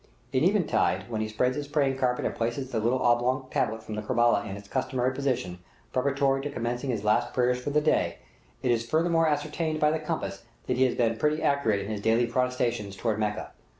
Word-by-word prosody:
At - - +2
eventide, 95 +5 +1
when 110 -1 -1
he 110 - -1
spreads 125 +4 0
his 145 -1 -4
praying 140 -2 +1
carpet 125 -1 0
and - - -1
places 120 +3 -3
the 115 - 0
little 120 +4 +1
oblong 125 +2 +2
tablet 110 0 -1
from 110 -1 -5
Kerbela 120 -3 +2
in 95 - -5
its 100 0 -12
customary 130 +1 -1
position, 130 -10 -2 0.3
preparatory 135 +1 +1
to 145 - -3
commencing 120 0 -3
his 110 -5 -1
last 120 +3 +1
prayers 125 0 +2
for - - -2
the 150 +1 +2
day, 155 - +1 0.5
it 125 - +2
is 115 -1 +1
furthermore 165 0 +3
ascertained 155 +1 -1
by 150 0 +4
the 160 - 0
compass 155 - -4 0.2
that - - -1
he 130 - +5
has 125 - 0
been 115 -2 +1
pretty 150 +5 +1
accurate 115 -8 +2
in 100 +2 -5
his 105 -2 -3
daily 115 +3 +3
prostrations 120 -4 -1
toward 110 0 -1
Mecca. 105 -1 -2
125 Hz, 210 wpm, -27 LUFS, 110-140 Hz, 0.5 s, he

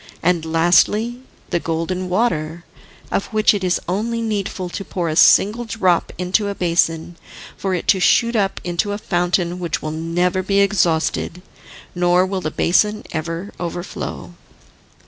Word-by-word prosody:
And 170 -1 +1
lastly 180 +9 +2 0.3
the 175 - +1
Golden 170 +3 -3
Water, 170 -5 -1 0.5
of - - -1
which 215 -1 +3
it 200 -2 -2
is 180 -1 +1
only 220 +6 -1
needful 205 -4 -3
to 195 - -5
pour 170 0 -3
a 155 - -2
single 210 +7 +5
drop 195 -6 0
into 185 +4 0
a 200 - -3
basin 170 -1 0 0.4
for 190 -1 -2
it 175 - -5
to 190 - +5
shoot 235 +5 +3
up 195 -3 0
into 180 +4 -1
a - - -3
fountain, 175 -2 -1
which 170 -3 -2
will 155 - -3
never 175 +4 0
be 195 +1 +1
exhausted, 180 -3 +1 0.5
nor 175 +1 +3
will 190 0 -3
the 155 - -2
basin 210 +7 +1
ever 165 +4 -4
overflow." 175 0 -5
180 Hz, 150 wpm, -20 LUFS, 170-200 Hz, 0.5 s, single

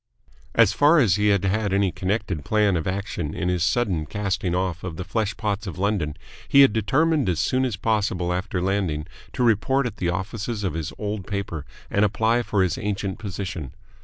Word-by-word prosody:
As - - +5
far 150 +4 +5
as 110 - +4
he 105 0 +2
had 100 -2 +3
had 100 +1 0
any 100 -1 +2
connected 95 -5 -2
plan 105 0 +2
of 80 0 -2
action 95 -5 -3
in 90 - -1
his 90 -2 +1
sudden 95 -8 +1
casting 95 0 -1
off 90 -1 -2
of 90 -3 -5
the 90 - -3
flesh 100 +2 -2
pots 105 -1 -2
of 95 - -6
London, 95 -6 -1 0.3
he 140 - +6
had 135 -6 +6
determined 135 - +2
as 85 -3 0
soon 130 +1 +1
as 120 -5 -1
possible 100 -5 0
after 90 0 -2
landing 95 -6 0 0.3
to 125 - 0
report 125 +4 +2
at 120 - -4
the 85 - -1
office 95 +4 -3 0.2
of 95 - -1
his 80 -2 -3
old 105 -2 -4
paper 100 -8 -4 0.2
and 100 - +3
apply 110 +3 +2
for 105 -4 +1
his 90 - -1
ancient 100 -1 -3
position. 95 - -5
100 Hz, 195 wpm, -24 LUFS, 90-110 Hz, 0.3 s, he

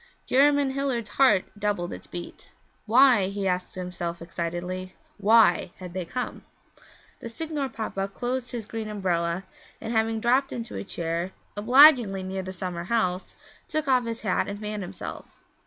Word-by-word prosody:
Jerymn 285 0 +4
Hilliard's 260 -6 -2
heart 260 -9 +4
doubled 200 -4 -1
its - - -10
beat. 175 0 -9 0.3
Why, 240 -3 +6
he 195 0 -2
asked 180 0 -2
himself 180 -2 -4
excitedly, 175 +2 -5 0.2
why 220 -4 +4
had 180 -2 -9
they 185 -1 -3
come? 250 +8 -5 0.8
The 230 - -7
Signor 295 +2 -3
Papa 195 -4 -3
closed 245 +4 -3
his 235 -3 -5
green 220 0 -5
umbrella, 180 -3 -1 0.3
and 225 - -5
having 225 0 +1
dropped 255 +4 +2
into 235 -1 -6
a - - -4
chair 170 0 -3 0.2
obligingly 240 -3 +6
near 190 +1 -3
the 185 0 -6
summer 180 -2 -5
house 185 -4 -1 0.3
took 310 -1 -2
off 255 -2 +3
his 230 0 -4
hat 190 -4 0
and 200 0 -5
fanned 210 -1 -4
himself. 185 0 -8
205 Hz, 155 wpm, -26 LUFS, 185-245 Hz, 0.8 s, Why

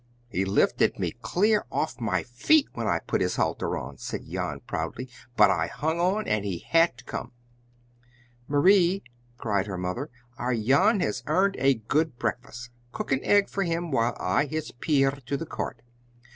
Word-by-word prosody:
"He 95 -3 -1
lifted 95 - +2
me - - -1
clear 205 - +2
off 130 -5 -2
my 95 -6 0
feet 280 - +3
when - - -3
I - - +2
put - - 0
his - - 0
halter - - -1
on," - - -7
said - - -5
Jan - - -4
proudly, 130 - -4 0.3
"but 105 -2 +7
I 85 -4 0
hung 160 +5 -2
on 195 +5 +1
and 105 -1 +1
he 95 -4 -2
had 165 -5 +3
to 130 - -13
come!" 125 - -6 1.1
"Marie," 180 +5 +4 0.3
cried 105 -3 -1
her 95 -2 -4
mother, 90 +11 -3 0.3
"our 125 0 0
Jan 160 - +3
has 105 +1 -1
earned 190 +6 +2
a 135 +1 +4
good 135 +5 -1
breakfast! 125 -1 -4 0.2
Cook - - -5
an 135 0 +1
egg 205 -1 +4
for 195 - -3
him, 170 -2 -1
while 115 -2 +1
I 95 +11 +1
hitch 155 +1 -4
Pier 135 -4 +3 0.2
to 140 - -1
the 165 - -5
cart. 115 -6 -5
135 Hz, 175 wpm, -27 LUFS, 115-170 Hz, 1.1 s, but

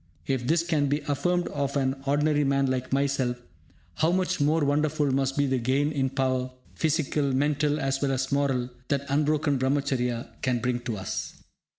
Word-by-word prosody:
If 130 -3 -1
this 165 +1 +3
can 155 -4 +1
be 145 +2 0
affirmed 175 +5 0
of 140 -1 -2
an 135 -1 +1
ordinary 150 +1 +2
man 140 0 +2
like 130 0 -3
myself, 135 -2 +1 0.6
how 160 +2 +1
much 185 -2 0
more 150 +1 +3
wonderful 150 0 +1
must 135 0 0
be 145 - +3
the 130 -1 0
gain 135 +5 +1
in 135 -3 0
power, 130 -1 0 0.2
physical, 150 -3 0
mental, 145 +2 +1
as 135 -1 -1
well 140 -1 +1
as 130 +1 -2
moral 135 -3 0 0.2
that 140 0 -1
unbroken 145 0 +1
Brahmacharya 130 -3 -1
can 125 -2 +1
bring 120 +1 -1
to 120 -3 -4
us! 95 0 -5
140 Hz, 175 wpm, -27 LUFS, 130-150 Hz, 0.6 s, this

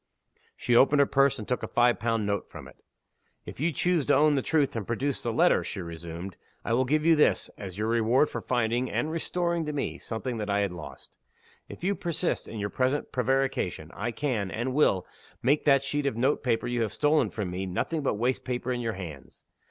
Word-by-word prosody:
She 120 - 0
opened 140 +4 +5
her 140 - +6
purse, 140 0 +3
and 105 - -7
took 125 - -1
a - - -4
five 120 0 +3
pound 115 -2 0
note 100 -1 -2
from - - -10
it. - - -16 0.7
"If - - -9
you 165 +4 +1
choose 175 +2 +1
to - - +5
own 150 +2 +5
the 135 - +1
truth, 145 -2 +1
and 110 -4 -4
produce 135 +4 -1
the 120 - -2
letter," 170 +10 +3
she 100 - -5
resumed, 85 +1 -7 0.3
"I - - 0
will 130 +2 +2
give 150 +4 +1
you 165 -1 +6
this, 150 - +2
as 95 -2 -8
your 105 +1 -1
reward 115 +5 +3
for - - -5
finding, 120 0 0
and 155 - -1
restoring 170 +1 -1
to 150 - -2
me, 145 - -3
something 120 +2 -4
that 105 -1 -4
I 100 0 +2
had 100 -2 0
lost. 85 -3 -11 0.5
If - - -10
you 195 +2 +2
persist 175 -2 -2
in 115 - -7
your 100 0 -3
present 130 +3 0
prevarication, 130 -10 -1
I 110 +3 -3
can, 120 -6 -2
and 120 +6 -3
will, 115 -10 +3 0.4
make 140 +5 +2
that 140 -2 +5
sheet 145 +1 -1
of 130 - -2
note 130 +5 +1
paper 120 -4 0
you 120 0 -1
have 110 -3 0
stolen 150 +1 +2
from 100 -5 -4
me 95 +2 -3
nothing 150 - -2
but 135 - 0
waste 125 +5 0
paper 125 0 -3
in 125 -1 -2
your 115 -2 -2
hands. 80 -8 -9
125 Hz, 220 wpm, -27 LUFS, 105-145 Hz, 0.7 s, her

